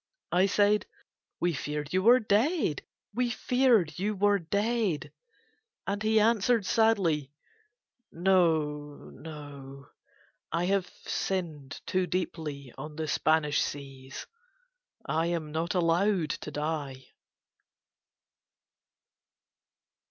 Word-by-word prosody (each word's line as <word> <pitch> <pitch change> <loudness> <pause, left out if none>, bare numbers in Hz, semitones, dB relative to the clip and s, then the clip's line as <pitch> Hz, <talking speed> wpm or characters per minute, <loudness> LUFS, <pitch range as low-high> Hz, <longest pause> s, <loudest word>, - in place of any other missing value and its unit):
I 180 +2 +4
said: 205 +1 +3 0.5
"We 175 0 +1
feared 150 +1 -4
you 185 - +3
were 240 +5 +7
dead. 220 - +1 0.3
We 245 +2 0
feared 235 - +2
you 210 +2 -1
were 205 +1 +3
dead." 205 0 -1 0.7
And 200 +1 -2
he 220 0 +3
answered 225 0 +3
sadly: 185 - +2 0.8
"No. 160 -5 +1
No. 140 -3 -10 0.6
I 170 +2 0
have 195 -1 +1 0.2
sinned 160 -8 -3
too 185 -1 0
deeply 150 -8 -4
on 150 +2 -7
the 160 0 -3
Spanish 150 -1 +2
seas: 135 -2 -6 0.8
I 160 +2 0
am 165 -3 -2
not 165 +4 -2
allowed 175 -1 +2
to - - -5
die." 150 -3 -4
170 Hz, 100 wpm, -29 LUFS, 150-205 Hz, 0.8 s, were